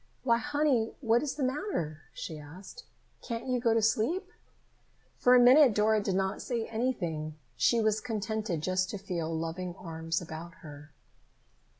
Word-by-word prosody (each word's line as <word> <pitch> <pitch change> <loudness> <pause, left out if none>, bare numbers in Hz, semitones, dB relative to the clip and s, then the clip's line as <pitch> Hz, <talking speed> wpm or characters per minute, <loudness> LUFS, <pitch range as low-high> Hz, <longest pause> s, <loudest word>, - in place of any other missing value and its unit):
"Why, 235 -2 +3
honey, 290 -5 +1
what 235 -3 +3
is 295 -2 -3
the 290 - -2
matter?" 255 - -2
she 155 -2 -7
asked. 185 - -11 0.4
"Can't 230 -2 -5
you 255 -1 0
go 230 -2 +2
to 225 - +2
sleep?" 330 - +1 0.9
For 250 0 +6
a - - +8
minute 250 -1 +7
Dora 215 0 +3
did 195 -2 -1
not 190 0 -1
say 235 -3 -2
anything. 175 -11 -2 0.2
She 180 - +3
was 215 0 +1
contented 215 -6 -2
just 185 +1 0
to 205 - -4
feel 170 -4 -3
loving 165 +2 -3
arms 165 -2 -3
about 165 0 -8
her. 145 0 -11
215 Hz, 160 wpm, -30 LUFS, 165-245 Hz, 0.9 s, a